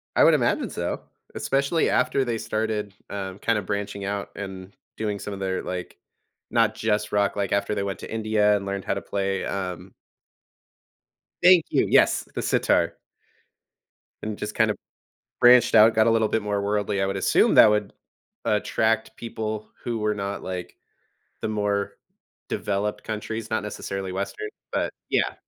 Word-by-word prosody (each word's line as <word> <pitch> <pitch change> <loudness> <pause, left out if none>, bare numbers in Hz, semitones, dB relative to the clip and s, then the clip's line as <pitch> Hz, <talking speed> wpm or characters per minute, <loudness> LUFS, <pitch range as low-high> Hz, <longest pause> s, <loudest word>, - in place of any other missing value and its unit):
I - - +6
would - - +7
imagine - - +1
so. - - -3 0.3
Especially 140 +4 +1
after 130 +1 +2
they 115 -2 -1
started, 110 -2 -2 0.2
um, 95 -1 -5
kinda 110 -1 +1
branching 100 +1 -4
out 100 0 -3
and 95 -1 -8 0.2
doing 105 -2 -2
some 105 - -5
of 95 - -7
their, 95 -1 -2
like, 90 -1 -5 0.5
not 115 -2 +2
just 105 -1 -1
rock, 100 -1 +2
like, 100 -1 0
after 100 +1 0
they 100 - -1
went 100 -1 -4
to - - -8
India 110 -2 +2
and 100 - -6
learned 100 -1 -3
how - - -1
to 100 - -4
play, 95 -1 -2
um 90 -3 -4 1.5
Thank 180 -2 +7
you - - +2
Yes, - - +4
the - - -1
sitar. - - +2 1.3
And 105 -1 -4
just 105 - -5
kind 110 -1 +3
of - - -5 0.6
branched 125 0 +7
out, 110 +1 +7
got 110 0 +4
a 115 - +5
little 110 -1 +3
bit 110 - 0
more 105 -1 -1
worldly. 100 -1 0
I - - +2
would 95 0 -2
assume 95 - +3
that 110 - +9
would 105 -1 0 0.5
attract 110 +1 +1
people 110 -2 -5
who 120 -2 -2
were 105 0 0
not, 100 0 -4
like, 90 -1 -6 0.6
the - - -2
more 105 -1 -1 0.6
developed 105 0 -2
countries, 110 +1 -4
not 110 - 0
necessarily 95 -2 -5
Western. 100 - -4 0.2
But, - - -1 0.2
yeah. - - +1
105 Hz, 165 wpm, -25 LUFS, 100-110 Hz, 1.5 s, that